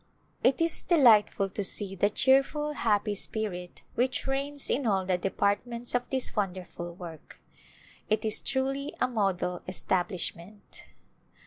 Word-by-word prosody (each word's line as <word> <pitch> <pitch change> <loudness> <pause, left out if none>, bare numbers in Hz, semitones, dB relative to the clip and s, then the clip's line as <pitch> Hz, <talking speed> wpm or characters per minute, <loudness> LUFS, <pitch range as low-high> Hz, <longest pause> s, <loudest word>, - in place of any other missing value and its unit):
It 260 - +4
is 330 -1 +4
delightful 225 - +4
to 200 +2 -4
see 195 0 -1
the 200 +2 +2
cheerful, 275 +6 +2
happy 210 -5 +1
spirit 195 -3 -3
which 255 +2 0
reigns 275 +1 -1
in 260 -1 0
all 190 -3 +1
the 185 -1 +1
departments 205 +6 -1
of 245 0 -1
this 260 -1 +1
wonderful 180 -4 -4
work. 170 -3 -11 0.7
It 215 +1 +1
is 215 - +3
truly 275 +2 -2
a - - +2
model 195 -6 -1
establishment. 185 +1 -3
210 Hz, 130 wpm, -28 LUFS, 190-265 Hz, 0.7 s, It